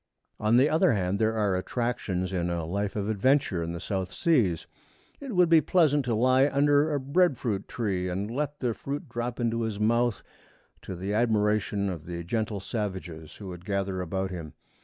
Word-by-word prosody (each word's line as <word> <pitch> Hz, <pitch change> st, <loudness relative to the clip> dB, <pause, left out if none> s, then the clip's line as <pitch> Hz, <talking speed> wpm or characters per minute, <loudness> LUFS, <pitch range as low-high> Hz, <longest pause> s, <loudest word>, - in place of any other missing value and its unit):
On 110 Hz, +2 st, +3 dB
the 135 Hz, +3 st, +5 dB
other 160 Hz, +2 st, +3 dB
hand, 95 Hz, -1 st, 0 dB
there 110 Hz, 0 st, +2 dB
are 100 Hz, -3 st, +1 dB
attractions 95 Hz, -3 st, -2 dB
in 90 Hz, -1 st, -1 dB
a 85 Hz, -2 st, -2 dB
life 100 Hz, +4 st, -2 dB
of 100 Hz, -1 st, -2 dB
adventure 110 Hz, -3 st, +2 dB
in 85 Hz, 0 st, -3 dB
the 85 Hz, -, -5 dB
South 95 Hz, 0 st, -3 dB
Seas. 115 Hz, -, +1 dB, 0.5 s
It 275 Hz, -7 st, -6 dB
would 180 Hz, -1 st, +5 dB
be 165 Hz, -1 st, +6 dB
pleasant 150 Hz, -4 st, +3 dB
to 120 Hz, -2 st, 0 dB
lie 130 Hz, +4 st, +4 dB
under 145 Hz, +2 st, +3 dB
a 145 Hz, -, 0 dB
bread 145 Hz, +2 st, +2 dB
fruit 105 Hz, -6 st, -2 dB
tree 95 Hz, -6 st, -2 dB
and 100 Hz, +4 st, -3 dB
let 145 Hz, +3 st, -3 dB
the 120 Hz, -3 st, 0 dB
fruit 145 Hz, -, -5 dB
drop 120 Hz, +1 st, -4 dB
into 115 Hz, -1 st, 0 dB
his 110 Hz, -3 st, -3 dB
mouth, 115 Hz, +1 st, +1 dB, 0.6 s
to 95 Hz, -, -6 dB
the 95 Hz, +4 st, -3 dB
admiration 105 Hz, -2 st, +1 dB
of 85 Hz, -5 st, -5 dB
the 85 Hz, -1 st, -5 dB
gentle 110 Hz, +2 st, -2 dB
savages 95 Hz, -7 st, -5 dB
who 100 Hz, -3 st, -8 dB
would 90 Hz, -1 st, -9 dB
gather 95 Hz, -1 st, -2 dB
about 95 Hz, +2 st, -2 dB
him. 85 Hz, -4 st, -7 dB
105 Hz, 190 wpm, -27 LUFS, 95-130 Hz, 0.6 s, be